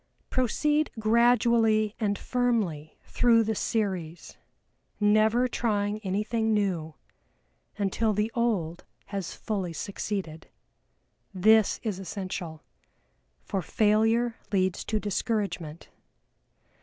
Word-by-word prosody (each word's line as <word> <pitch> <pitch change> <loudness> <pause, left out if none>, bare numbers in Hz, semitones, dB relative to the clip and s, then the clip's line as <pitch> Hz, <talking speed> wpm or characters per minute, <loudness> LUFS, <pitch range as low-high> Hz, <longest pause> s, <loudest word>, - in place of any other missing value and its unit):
Proceed 295 +5 +1
gradually 225 -1 +3
and 205 -3 0
firmly 215 -12 -1
through 230 -2 +3
the 220 0 -1
series, 190 -7 -3 0.6
never 215 +4 +3
trying 210 -3 -1
anything 215 +2 0
new, 175 -7 -1 0.8
until 210 +2 0
the 210 +2 0
old 195 -9 -1 0.3
has 195 -4 -4
fully 190 -6 -3
succeeded. 190 -3 -5 0.9
This 215 +3 +4
is 210 -4 -3
essential, 185 -4 -6 0.8
for 195 - -2
failure 225 +4 +2
leads 185 -2 0
to 215 - -1
discouragement. 200 -6 -3
210 Hz, 90 wpm, -27 LUFS, 190-225 Hz, 0.9 s, This